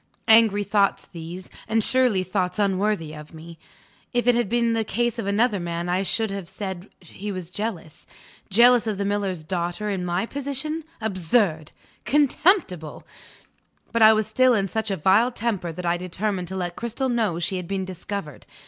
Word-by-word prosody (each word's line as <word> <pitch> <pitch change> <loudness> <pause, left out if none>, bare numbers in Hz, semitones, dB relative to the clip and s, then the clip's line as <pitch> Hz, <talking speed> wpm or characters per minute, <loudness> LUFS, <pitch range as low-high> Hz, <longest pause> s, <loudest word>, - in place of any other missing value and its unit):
Angry 220 -2 +5
thoughts 200 -1 +1
these 175 +2 -9 0.2
and 225 0 +2
surely 250 -7 +3
thoughts 185 -1 -2
unworthy 195 -5 0
of 150 +1 -11
me? 165 +1 -11 0.5
If 245 -1 +1
it 245 - +5
had 240 -4 0
been 235 0 +1
the 225 -1 +1
case 240 +3 -1
of 200 - -3
another 210 +1 +2
man 170 0 -3
I 180 +2 +1
should 220 +2 0
have 195 -3 -6
said 190 -1 -6
he 195 +4 -7
was 185 -3 -6
jealous. 180 -6 -5 0.4
Jealous 235 +3 +5
of 210 -3 -1
the 200 - -2
miller's 200 -4 -2
daughter 175 +5 -3
in 190 -2 -2
my 180 +3 -1
position? 285 +4 -4
Absurd! 185 -5 0 0.3
contemptible! 285 - +1 0.9
But 230 - 0
I 220 0 +9
was 215 0 +1
still 255 +2 +3
in 195 -2 0
such 220 +3 -3
a 195 - -1
vile 200 +9 +3
temper 205 -7 -2
that 180 +2 -7
I 170 0 +1
determined 185 +1 -3
to 190 - -6
let 175 -1 -3
Cristel 235 +3 -2
know 220 -8 0
she 175 +3 -2
had 180 -2 -6
been 195 0 -2
discovered. 185 -4 -7
200 Hz, 175 wpm, -24 LUFS, 180-225 Hz, 0.9 s, I